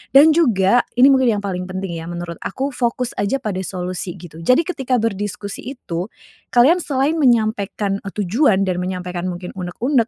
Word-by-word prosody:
Dan 295 +3 +9
juga 240 - +4 0.2
ini 250 +2 +7
mungkin 260 -1 +4
yang - - -9
paling 180 -2 -3
penting 185 -1 -4
ya 165 - -8
menurut 170 -1 -6
aku 270 +8 -3
fokus 250 -1 -1
aja 200 +6 +1
pada 200 -4 -2
solusi 180 -1 -4
gitu. 165 -3 -12
Jadi 255 - +3
ketika 270 -7 -1
berdiskusi 205 +2 -3
itu, 175 -7 -4 0.5
kalian 275 +9 +6
selain 295 0 0
menyampaikan, 215 -6 +1
eee, 200 -1 -8
tujuan 195 - +3
dan 180 -1 -1
menyampaikan 180 -1 -3
mungkin 180 0 -5
unek-unek, 230 +7 0
200 Hz, 165 wpm, -20 LUFS, 180-255 Hz, 0.5 s, Dan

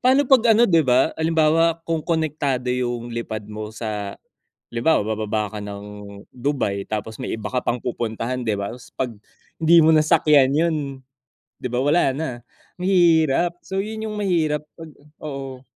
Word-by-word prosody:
paano 260 +3 +4
'pag 240 -4 +6
ano, 235 +3 +5
'di 165 -3 +4
ba, 130 +4 +4
halimbawa 165 +1 +2
kung 165 -1 -1
konektado 145 -6 -1
yung 120 -1 -2
lipad 110 -2 -4
mo 105 0 -6
sa 105 -3 -4 0.5
halimbawa, 120 +6 +2
bababa 110 -1 -2
ka - - -6
ng 100 0 -7 0.5
Dubai 125 -7 -2
tapos 110 +1 -4
may - - -3
iba 110 - -5
ka 130 - 0
pang 120 0 -1
pupuntahan, 120 +1 -3
'di 110 - +1
ba, 100 0 -3 0.3
'pag 130 -2 -1 0.5
hindi 165 +1 +5
mo 160 - +6
nasakyan 150 -3 +4
yun, 165 +1 +2 0.9
'di - - -2
ba, 125 - -1
wala 145 -2 +3
na, 160 +1 -2 0.5
mahirap. 175 -2 +3
So, 190 - -5
yun 220 +1 -5
yung 210 - -5
mahirap 160 -7 0
'pag 165 -1 -9 0.3
oo. 135 -3 -6
145 Hz, 155 wpm, -22 LUFS, 115-165 Hz, 0.9 s, pag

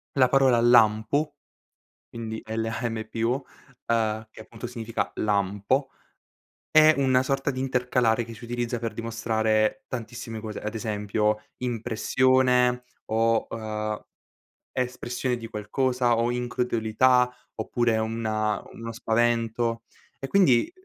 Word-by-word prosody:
la 130 -2 +5
parola 130 -2 +4
"lampo", 120 +5 +4 0.7
quindi 110 -1 -6
L-A-M-P-O, 115 0 -2 0.6
uhm, 110 -1 0
che - - -13
appunto 115 +2 -8
significa 115 -2 -3
"lampo", 105 +6 0 0.8
è 155 0 +7
una 130 -2 +3
sorta 135 +2 0
di 130 - -4
intercalare 125 -3 +1
che 115 0 -9
si 115 - -12
utilizza 120 0 -2
per 115 -2 -3
dimostrare 110 -1 0
tantissime 115 -2 -6
cose, 110 -1 -6
ad 105 +2 -5
esempio 105 -1 -1 0.2
impressione 125 +1 +2 0.2
o, 115 +1 +2
uhm, 110 -1 -4 0.7
espressione 125 0 -2
di 115 - -7
qualcosa, 120 +3 0
o 115 +1 +1
incredulità 125 0 +2 0.2
oppure 115 +1 0
una 110 -1 -1
uno 115 0 -6
spavento, 115 0 0 0.4
e 135 - -4
quindi 160 - +4
115 Hz, 110 wpm, -26 LUFS, 110-125 Hz, 0.8 s, è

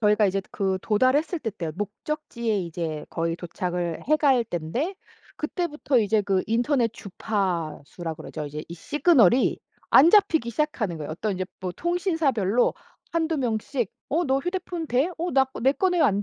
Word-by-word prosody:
저희가 210 -1 +4
이제 195 0 0
그 190 -1 -1
도달했을 260 - +2
때 230 -7 -3
때요. 175 -6 -5
목적지에 230 - -3
이제 165 -3 -4
거의 165 0 -1
도착을 175 -1 -3
해 305 - +5
갈 270 -5 +3
땐데 225 - -3 0.4
그때부터 305 -4 -1
이제 215 -1 +2
그 195 -2 +1
인터넷 240 +1 +1
주파수라 175 -6 -3
그러죠. 155 0 -6
이제 150 +1 -6
이 170 - -7
시그널이 260 - +3 0.3
안 315 +6 +8
잡히기 325 - +4
시작하는 230 - -1
거예요. 150 - -5
어떤 195 +6 -2
이제 185 0 -2 0.2
뭐 185 -1 -3
통신사별로 315 - +1 0.4
1-2 325 -1 0
명씩 240 -2 -1 0.2
"어 335 +5 +1
너 265 -2 +2
휴대폰 355 +1 -3
돼? 260 +4 +2
어 350 +2 -1
나 270 0 +5
거 265 - -10
내 265 +3 +4
거는 360 +3 +1
왜 - - +6
안 200 -1 +2
230 Hz, 330 characters per minute, -25 LUFS, 185-300 Hz, 0.4 s, 안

